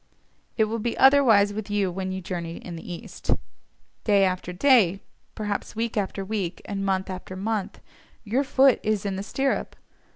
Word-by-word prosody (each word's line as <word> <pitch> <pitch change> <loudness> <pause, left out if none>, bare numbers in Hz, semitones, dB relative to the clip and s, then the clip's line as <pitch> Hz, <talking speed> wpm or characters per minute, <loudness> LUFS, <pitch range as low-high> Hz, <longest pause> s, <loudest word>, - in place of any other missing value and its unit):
It 220 - +4
will 220 +2 -1
be 235 +2 -2
otherwise 240 -7 +6
with 215 0 -5
you 205 -3 +1
when 190 +1 -3
you 190 0 -4
journey 170 -2 -5
in 175 - -8
the 165 +2 -8
East. 170 - -9 0.7
Day 200 -2 +4
after 185 -1 -2
day, 195 -2 +4 0.4
perhaps 210 -1 -3
week 230 +1 -2
after 195 -1 -2
week 195 -4 -3
and 195 -1 -3
month 190 -1 0
after 185 0 -7
month, 205 +1 -3 0.4
your 235 +6 +1
foot 270 -1 +4
is 215 -1 -1
in 195 -1 -1
the 190 - -3
stirrup. 270 +6 -1
200 Hz, 170 wpm, -25 LUFS, 190-220 Hz, 0.7 s, otherwise